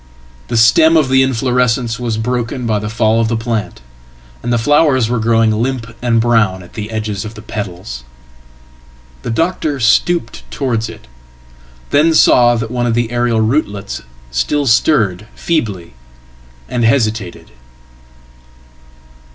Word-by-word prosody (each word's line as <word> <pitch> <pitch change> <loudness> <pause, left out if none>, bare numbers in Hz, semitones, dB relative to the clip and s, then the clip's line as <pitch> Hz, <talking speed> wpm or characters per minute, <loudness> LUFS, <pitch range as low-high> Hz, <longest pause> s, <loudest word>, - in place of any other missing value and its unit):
The 120 - -1
stem 160 +9 +5
of 145 -4 +2
theinflorescence 125 -2 +1
was 115 -3 -2
broken 120 +2 -2
by 110 -2 0
the 105 0 -5
fall 110 0 +1
of 115 - +1
the 115 0 -1
plant, 115 - -3 0.6
and 120 - -3
the 120 - +2
flowers 130 -1 +2
weregrowing 115 -1 +2
limp 115 +1 -3
and 120 -2 +2
brown 110 -6 +1
at 90 - -16
the 105 -1 -6
edges 110 -3 -4
of 110 +1 -8
the 105 - -10
petals. 95 - -6 1.2
The - - -6
doctor 155 +3 -1
stoopedtowards 125 -3 0
it, 105 -1 -12 0.9
then 160 +3 +3
saw 120 -5 +5
that 115 0 -4
one 120 -1 -1
of 115 - 0
the 120 -1 -1
aerial 120 -2 +1
rootlets 110 -4 -2 0.3
still 140 - 0
stirred 110 - +2
feebly, 105 - -2 0.7
and 120 - -2
hesitated. 110 -6 -1
115 Hz, 130 wpm, -15 LUFS, 110-125 Hz, 1.2 s, stem